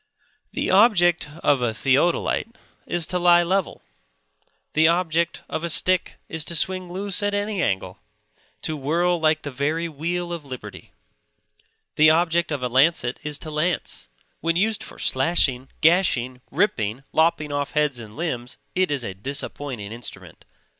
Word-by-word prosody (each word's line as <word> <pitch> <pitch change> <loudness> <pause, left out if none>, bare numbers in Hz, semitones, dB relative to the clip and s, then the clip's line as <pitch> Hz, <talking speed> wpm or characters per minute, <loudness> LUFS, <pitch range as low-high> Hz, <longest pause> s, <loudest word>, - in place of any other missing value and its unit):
The - - -1
object 180 -6 +4
of 140 -3 +3
a 115 -2 0
theodolite 165 - +1 0.3
is 175 -2 -1
to 180 +1 -1
lie 175 0 +5
level; 185 +1 -1 0.9
the 160 +1 +5
object 170 -1 0
of 160 - -4
a 170 - -1
stick 185 +3 +2
is 160 -1 -3
to 170 - -1
swing 185 +2 0
loose 195 +2 -1
at 205 0 0
any 205 -1 -1
angle; 95 - -2 0.6
to 155 - -1
whirl 170 +5 +1
like 155 -1 +2
the 145 - -5
very 155 +6 -1
wheel 170 +3 -3
of 170 -3 -6
liberty. 130 -3 -9 1.1
The 155 +1 +7
object 170 +1 +2
of 140 -4 -2
a - - +1
lancet 130 0 +2
is 150 -1 -2
to 155 - -6
lance; 155 - -2 0.3
when 165 +1 0
used 215 +4 +1
for - - -9
slashing, 135 -2 +1
gashing, 135 -8 +2
ripping, 135 - 0
lopping 155 -2 +2
off 145 0 -2
heads 150 -5 +1
and 110 -2 -10
limbs, 125 -8 -4 0.2
it 185 0 +1
is 140 -4 -1
a 100 - -4
disappointing 130 0 -5
instrument. 115 +1 -8
160 Hz, 155 wpm, -23 LUFS, 135-175 Hz, 1.1 s, The